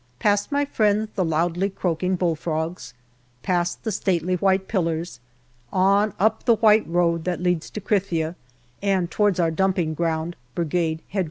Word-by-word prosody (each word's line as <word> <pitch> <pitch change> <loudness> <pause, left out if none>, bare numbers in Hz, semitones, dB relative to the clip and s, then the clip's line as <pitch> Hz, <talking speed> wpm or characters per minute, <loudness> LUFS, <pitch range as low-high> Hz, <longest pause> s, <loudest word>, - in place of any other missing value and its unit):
Past 205 - +1
my 285 0 +1
friends 215 -4 +1
the 190 - 0
loudly 170 +4 0
croaking 185 -1 -1
bull 175 -2 0
frogs, 160 -4 -4 0.5
past 175 -1 -1
the 220 - -2
stately 185 -3 0
white 190 +1 +1
pillars, 170 - -2 0.5
on 200 +2 +3
up 220 +3 +1
the 235 -2 +5
white 220 0 +4
road 170 -1 +1
that 180 -1 -1
leads 180 -2 0
to - - -6
Krithia 180 -6 0 0.5
and 190 -4 0
towards 205 -2 +2
our 165 -2 +2
dumping 180 -2 0
ground 165 +1 -2 0.2
Brigade 165 -1 -1
H.Q. 200 - -3
180 Hz, 155 wpm, -23 LUFS, 165-200 Hz, 0.5 s, the